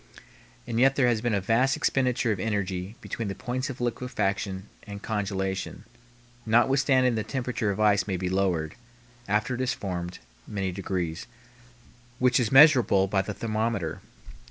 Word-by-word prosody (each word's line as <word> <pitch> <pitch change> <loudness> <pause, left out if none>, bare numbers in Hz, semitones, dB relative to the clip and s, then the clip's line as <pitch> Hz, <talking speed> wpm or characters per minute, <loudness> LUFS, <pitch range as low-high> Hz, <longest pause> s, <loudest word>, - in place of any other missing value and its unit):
And 115 -1 -2
yet 135 +2 +5
there 135 - +3
has 120 -3 +2
been 120 -2 0
a - - +1
vast 115 +7 +2
expenditure 125 -3 +1
of 100 - -2
energy 100 -1 -2
between 115 - -4
the 100 - -4
points 130 +1 -3
of 130 - -7
liquefaction 105 -5 -2
and 100 -2 -9
congelation, 95 -2 -3 0.6
notwithstanding 130 +2 +3
the 110 -1 -1
temperature 125 -4 -2
of 100 0 -2
ice 105 -3 +3
may 95 -2 -1
be 90 +1 -3
lowered, 90 -4 0 0.5
after 105 +5 0
it 125 - -3
is 130 - 0
formed, 90 -2 -5 0.3
many 95 -3 -2
degrees, 90 -2 -3 0.9
which 125 -1 +3
is 115 -4 0
measurable 135 -9 +6
by 95 0 +1
the 100 +1 -6
thermometer. 110 -6 -2
105 Hz, 155 wpm, -27 LUFS, 95-125 Hz, 0.9 s, measurable